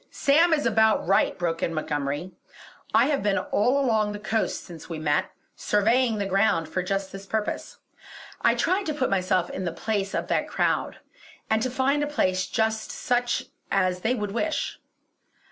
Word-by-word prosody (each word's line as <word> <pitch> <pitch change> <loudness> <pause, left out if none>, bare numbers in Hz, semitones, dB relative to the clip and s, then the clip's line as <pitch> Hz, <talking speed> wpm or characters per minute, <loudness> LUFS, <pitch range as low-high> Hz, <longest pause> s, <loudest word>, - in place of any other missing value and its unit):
"Sam 325 +5 +3
is 300 -4 +2
about 220 -1 +3
right!" 195 +2 +2
broke 165 -2 -2
in 165 - -1
Montgomery 145 +2 -2 0.6
"I - - +5
have 290 -2 +1
been 200 -1 +1
all 215 +8 +1
along 220 -6 +1
the 205 - -6
coast 215 +1 -1
since 170 -2 -11
we 165 - -4
met, 150 -1 0 0.3
surveying 225 +3 +2
the 200 - -1
ground 195 -4 +2
for 160 +4 -2
just 195 +1 -2
this 195 0 -9
purpose. 215 0 -3 0.6
I - - +4
tried 370 +3 0
to 305 - -1
put 260 -7 0
myself 185 -2 +1
in - - -4
the 175 - -2
place 200 +2 -2
of - - -2
that - - 0
crowd, - - 0 0.5
and 220 0 +3
to 255 - 0
find 270 +3 +1
a 295 - 0
place 185 -10 0
just 220 0 -1
such 245 -1 -1 0.2
as 185 -2 +1
they 230 +7 0
would 210 -4 -3
wish. 305 +9 -2
210 Hz, 180 wpm, -25 LUFS, 185-245 Hz, 0.6 s, I